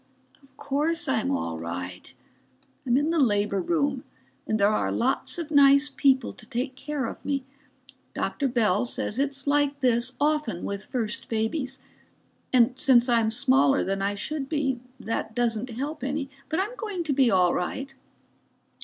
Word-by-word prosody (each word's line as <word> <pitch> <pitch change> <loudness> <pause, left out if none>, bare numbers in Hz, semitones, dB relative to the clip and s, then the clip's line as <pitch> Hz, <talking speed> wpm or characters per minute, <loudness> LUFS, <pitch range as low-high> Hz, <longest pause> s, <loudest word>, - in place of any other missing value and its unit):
Of 270 -1 -24
course 300 +4 0
I'm 255 -5 0
all 80 -1 -2
right. 90 +2 -6 0.8
I'm 245 +1 +3
in 295 +3 +1
the 335 - +1
labor 205 -6 +2
room 285 - 0 0.4
and 220 - 0
there 200 - +5
are 215 - 0
lots 260 +7 0
of 330 -3 -5
nice 280 0 +6
people 270 -2 +2
to - - -13
take 255 +2 -3
care 280 0 -3
of - - -7
me. 275 -2 -1 0.7
Dr. 280 - -1
Bell 225 -5 +2
says 240 -1 -3
it's 275 -1 -1
like 285 0 +1
this 245 -1 +2
often 295 - 0
with 200 0 -4
first 230 -3 -3
babies. 255 +5 -2 0.7
And 250 0 +3
since 255 -4 +5
I'm 230 -3 +3
smaller 270 +3 +3
than 195 +1 -2
I 200 +1 0
should 275 +5 -4
be 270 -5 0 0.2
that 220 0 -4
doesn't 240 0 0
help 285 +6 -5
any. 275 0 -3 0.2
But 320 +4 +1
I'm 425 +6 -4
going 410 -6 -3
to 305 -3 -1
be 265 -2 +4
all 180 -4 +3
right." 270 +10 -3
265 Hz, 165 wpm, -26 LUFS, 225-285 Hz, 0.8 s, nice